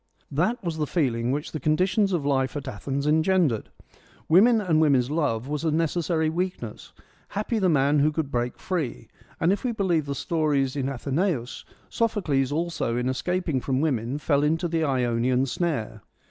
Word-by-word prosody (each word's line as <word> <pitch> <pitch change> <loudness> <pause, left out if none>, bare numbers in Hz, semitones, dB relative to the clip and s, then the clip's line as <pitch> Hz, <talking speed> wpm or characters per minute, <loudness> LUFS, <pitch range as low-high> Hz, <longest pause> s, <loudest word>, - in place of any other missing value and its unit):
That 205 - 0
was 165 -3 -3
the 150 - 0
feeling 125 -8 0
which 145 +3 -2
the 155 - -4
conditions 185 +7 +2
of 170 -6 -1
life 135 0 0
at 140 -1 -6
Athens 135 +4 -3
engendered. 160 - +2 0.6
Woman 220 +8 +6
and 165 -6 +2
woman's 135 -4 +3
love 140 -7 0
was 150 +1 -3
a 165 - +2
necessary 165 +1 0
weakness: 165 - -4 0.4
happy 215 +2 -2
the 190 -3 +2
man 145 -1 +3
who 150 +2 +3
could 150 -2 -3
break 120 0 -1
free, 165 -10 -3 0.3
and 170 +4 +3
if 200 - -4
we 250 - 0
believe 175 -9 0
the 140 - -2
stories 145 -4 0
in 135 -1 -1
Athenaeus, 140 0 -2 0.2
Sophocles 165 - 0
also 160 -7 -1
in 125 +1 0
escaping 160 +1 -1
from 130 0 -1
women 135 -4 0
fell 145 -1 +1
into 160 +4 +1
the 165 -1 0
Ionian 125 -2 +1
snare. 130 - -2
150 Hz, 170 wpm, -25 LUFS, 135-175 Hz, 0.6 s, Woman